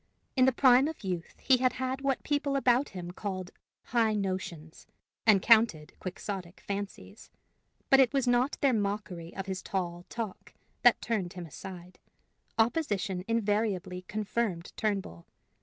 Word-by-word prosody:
In 255 -2 +5
the 265 - +5
prime 260 +1 +5
of 320 -6 -6
youth 180 -3 -4
he 260 - +4
had 255 0 +2
had 260 +1 -3
what 275 -1 +1
the - - -33
people 285 -1 0
about 260 0 +3
him 175 -2 -7
called 185 -1 -5 0.3
high 225 -2 +2
notions, 185 -5 -4 0.4
and 200 -4 +6
counted 220 -10 +4
quixotic 185 -1 -6
fancies. 200 0 -6 0.6
But 270 - +8
it 260 -3 +5
was 270 -2 +1
not 245 +3 +2
their 275 -3 +4
mockery 200 -5 -2
of 195 - -4
his 190 -2 -4
tall 175 -2 -3
talk 225 -5 -6 0.3
that - - +5
turned 195 -7 -1
him 180 -2 -7
aside; 180 +3 -10 0.6
opposition 210 - +1
invariably 205 -5 0
confirmed 210 -4 -2
Turnbull. 195 - -2
205 Hz, 145 wpm, -30 LUFS, 185-245 Hz, 0.6 s, But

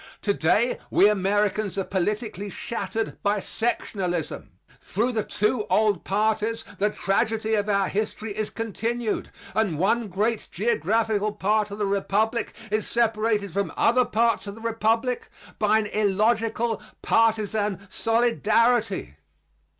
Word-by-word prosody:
To 200 - +2
day 200 +9 +2
we 200 - +5
Americans 205 0 +1
are 195 - +1
politically 205 +2 -2
shattered 225 0 -4
by 205 0 +1
sectionalism. 185 - -2 0.3
Through 230 +6 -1
the 225 -3 0
two 210 +2 0
old 210 -4 +2
parties 220 +2 0 0.2
the 210 +2 +3
tragedy 220 +2 0
of 210 -1 +1
our 200 -2 +2
history 215 0 -3
is 215 0 -2
continued; 225 +1 -2 0.2
and 200 -8 +1
one 220 +6 +1
great 210 +4 -1
geographical 215 +2 0
part 210 +1 +1
of 200 - -7
the 210 - 0
Republic 200 +3 0 0.2
is 215 0 0
separated 215 -4 +1
from 200 +1 -1
other 250 +2 +4
parts 230 -2 +1
of 200 - -6
the 225 - -12
Republic 230 +2 0 0.3
by 215 0 +4
an 220 - 0
illogical 220 +3 +1 0.2
partisan 210 -3 +1
solidarity. 230 - +1
215 Hz, 125 wpm, -25 LUFS, 200-225 Hz, 0.3 s, we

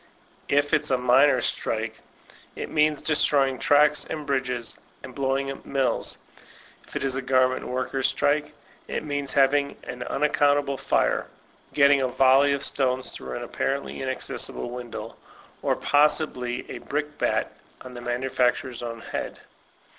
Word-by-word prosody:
If 145 +1 +2
it's 155 - +2
a 130 - +2
miners' 125 +1 +4
strike, - - -2 0.5
it - - -6
means 150 -1 +2
destroy 145 -3 +3
ing 130 - -6
tracks 150 +1 +4
and 155 -2 -6
bridges, 125 -4 -2 0.2
and - - -9
blowing 135 0 -1
up 135 - -9
mills. 135 -2 0 0.7
If - - -14
it - - -2
b 135 - -1
a - - -3
garment 130 0 +1
workers' 130 +1 -1
strike, 150 +1 0 0.4
it - - -3
means 145 -2 -3
having 140 +1 +2
an 125 - -7
unac 150 +1 0
countable 145 -1 +2
fire, - - +1 0.5
getting 140 -1 +5
a 130 - +1
volley 135 +2 +4
of 140 0 -2
stones 130 -1 0
through - - -6
an 120 - -5
apparently 135 +3 -3
inaccessible 130 -2 -2
window, 120 -3 -7 0.4
or - - +1
possibly 145 -4 +1
a - - -6
brickbat 150 0 -2 0.3
00 130 -1 -10
the 120 - -8
manufacturer's 125 0 -1
own 115 -1 -6
head. - - -5
135 Hz, 145 wpm, -25 LUFS, 125-145 Hz, 0.7 s, getting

